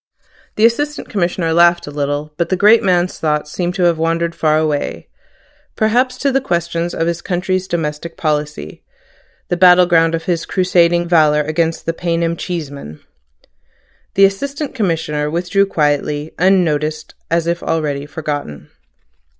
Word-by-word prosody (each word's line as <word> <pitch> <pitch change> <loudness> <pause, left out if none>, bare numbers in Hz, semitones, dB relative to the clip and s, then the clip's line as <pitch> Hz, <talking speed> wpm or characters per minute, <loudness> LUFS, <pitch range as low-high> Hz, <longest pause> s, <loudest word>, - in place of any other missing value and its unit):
The 215 - +4
Assistant 295 +6 0
Commissioner 175 -4 -1
laughed 170 +1 +4
a 145 - -8
little; 145 +1 -3
but 170 +1 -2
the 185 - +1
great 210 +4 +5
man's 180 -1 0
thoughts 150 -1 -1
seemed 175 +1 -2
to 185 - 0
have 170 -2 +2
wandered 165 +1 0
far 155 -2 +1
away, 155 -2 -2 0.7
perhaps 245 +4 +1
to 275 +1 0
the 270 +1 +1
questions 170 -4 -2
of 165 - -1
his 170 0 -2
country's 185 +1 -2
domestic 165 -1 -4
policy, 150 -1 -3 0.7
the 175 - 0
battle 180 0 +6
ground 165 -1 +3
of 165 - -5
his 170 -1 -2
crusading 175 -2 +2
valour 155 -3 +4
against 160 +2 -1
the 165 - -1
paynim 170 -1 -1
Cheeseman. 145 - -6 1.2
The 195 - +6
Assistant 280 +9 -3
Commissioner 160 - -1
withdrew 180 +5 +1
quietly, 150 -2 -1
unnoticed, 155 -5 +1 0.2
as 165 0 +1
if 170 0 -1
already 145 -3 -2
forgotten. 145 - -6
170 Hz, 145 wpm, -17 LUFS, 155-180 Hz, 1.2 s, battle